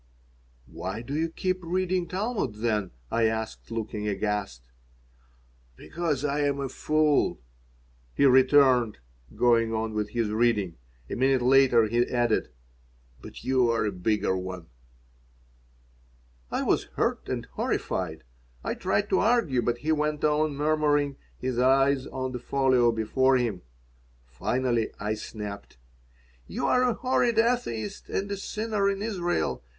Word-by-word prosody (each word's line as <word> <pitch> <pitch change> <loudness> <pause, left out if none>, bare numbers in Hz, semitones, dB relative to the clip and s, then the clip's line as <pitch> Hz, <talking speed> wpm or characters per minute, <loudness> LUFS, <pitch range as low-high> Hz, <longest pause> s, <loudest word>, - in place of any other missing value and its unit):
"Why 95 - -6
do 135 - -6
you 160 +2 0
keep 185 +2 -2
reading 180 +1 -1
Talmud, 195 - -2
then?" 105 -3 -1 0.2
I 115 - +2
asked, 110 0 -3
looking 110 -2 -4
aghast 100 - -2 1.1
"Because 150 - -3
I 145 0 0
am 140 -1 0
a 135 -1 -3
fool," 155 - +1 0.8
he 140 - +3
returned, 130 -3 +5 0.4
going 115 -2 +3
on 110 0 -2
with 105 -1 -2
his 115 -2 -1
reading. 105 - +1 0.3
A - - -6
minute 130 0 +2
later 130 -2 +5
he 120 +3 +2
added, 120 -2 +1 0.7
"But - - -11
you 130 -2 +2
are 115 -2 +1
a 105 - 0
bigger 95 +1 0
one." 90 -2 -6 1.8
I - - -1
was - - +1
hurt - - -1
and - - -3
horrified. - - -2 0.4
I - - -1
tried 205 - 0
to 190 - +4
argue, 215 - +2
but 120 +1 0
he 155 +6 -2
went 150 -1 0
on 150 -1 +2
murmuring, 145 -1 +1 0.2
his 125 -1 -2
eyes 135 +1 +3
on 130 -1 -4
the 125 - -5
folio 130 -2 +2
before 130 +4 +2
him 115 -7 -2 0.6
Finally 115 - -1
I 105 +2 -1
snapped: 105 - -7 0.7
"You - - -3
are 250 - +3
a 250 -2 +2
horrid 245 -3 +1
atheist 225 - 0
and 200 +1 -2
a 200 - -2
sinner 210 0 -1
in 200 0 -2
Israel. 175 - -1
130 Hz, 135 wpm, -27 LUFS, 110-155 Hz, 1.8 s, returned